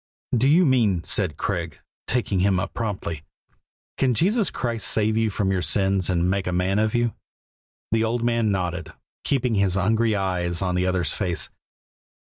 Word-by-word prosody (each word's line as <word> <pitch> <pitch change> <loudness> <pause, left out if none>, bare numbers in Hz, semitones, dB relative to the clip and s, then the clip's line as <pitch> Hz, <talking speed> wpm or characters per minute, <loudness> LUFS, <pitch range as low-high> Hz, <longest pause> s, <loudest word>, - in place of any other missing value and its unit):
"Do 125 +3 +3
you 170 +5 +5
mean," 110 - +2
said 85 -6 -1
Craig, 85 -6 -3 0.3
taking 110 -6 0
him 95 0 +2
up 95 +1 -4
promptly, 95 -8 -4 0.8
"can 130 -3 +2
Jesus 200 - +2
Christ 115 -3 -3
save 110 0 +2
you 110 0 +2
from 95 -1 -1
your 95 -1 0
sins 95 +4 +2
and 85 -1 +1
make 95 0 -1
a - - 0
man 90 +3 +1
of 110 +1 +1
you?" 120 -1 +1 0.8
The 115 0 +2
old 115 +1 -1
man 115 -2 +1
nodded, 90 -3 -2 0.3
keeping 125 -4 0
his 100 -3 +2
hungry 110 +3 +2
eyes 90 -3 -1
on 90 -1 0
the 90 +1 0
other's 90 -4 +1
face. 90 -5 -1
100 Hz, 170 wpm, -24 LUFS, 90-115 Hz, 0.8 s, you